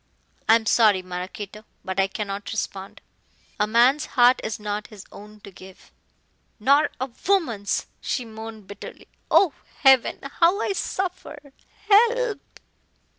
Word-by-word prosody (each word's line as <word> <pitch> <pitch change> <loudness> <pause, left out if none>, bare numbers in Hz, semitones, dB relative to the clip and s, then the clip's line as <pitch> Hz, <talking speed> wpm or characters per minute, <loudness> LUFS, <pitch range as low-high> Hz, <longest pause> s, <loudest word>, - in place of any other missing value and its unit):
"I 225 - +8
am 225 -1 0
sorry, 215 -5 +4
Maraquito, 185 +3 -7 0.2
but 190 0 -3
I 195 - +3
cannot 200 -1 -5
respond. 195 -3 -5 0.6
A 210 - +2
man's 250 +7 +3
heart 245 +1 +5
is 220 0 -4
not 210 0 -4
his 210 -3 -13
own 210 +1 -13
to 200 - -12
give." 190 +1 -15 0.7
"Nor 280 +7 +4
a 260 0 -4 0.2
woman's," 250 - 0 0.2
she 250 - -2
moaned 220 -1 -10
bitterly; 200 +1 -11 0.2
"oh, 360 -8 +4 0.3
heaven, 265 -2 +5 0.2
how 350 +4 +4
I 400 - -1
suffer. 365 -7 -5 0.3
Help!" 460 +2 +3
220 Hz, 130 wpm, -23 LUFS, 200-280 Hz, 0.7 s, I